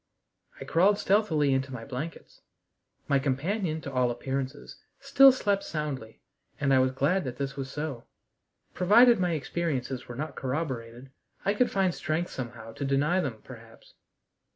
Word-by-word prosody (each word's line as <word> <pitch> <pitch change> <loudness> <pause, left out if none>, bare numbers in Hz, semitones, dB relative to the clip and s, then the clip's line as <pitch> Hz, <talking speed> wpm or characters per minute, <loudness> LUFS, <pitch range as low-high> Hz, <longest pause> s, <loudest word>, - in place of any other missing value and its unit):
I - - -7
crawled 195 +5 +3
stealthily 170 -10 +2
into 135 0 -1
my 115 -3 -7
blankets. 140 +5 -7 0.7
My 140 - +3
companion, 155 +5 -1
to 140 - -7
all 125 -1 +2
appearances, 135 +3 -4 0.2
still 275 0 +7
slept 205 -6 0
soundly, 140 -8 -5 0.4
and 140 -1 +2
I 130 - +5
was 130 0 +3
glad 155 +9 +1
that 125 -3 -5
this 140 -1 -3
was 135 -1 -5
so. 145 -4 -5 0.7
Provided 230 +5 +6
my 180 -2 +1
experiences 135 -4 -3
were 120 - -7
not 145 +1 -5
corroborated, 130 -3 -4 0.3
I 200 - +3
could 245 +4 +2
find 190 -2 +1
strength 160 +3 -2
somehow 115 -3 -7
to 140 - -6
deny 140 +6 +2
them, 120 -10 -3
perhaps. 115 -3 -14
140 Hz, 155 wpm, -28 LUFS, 130-175 Hz, 0.7 s, still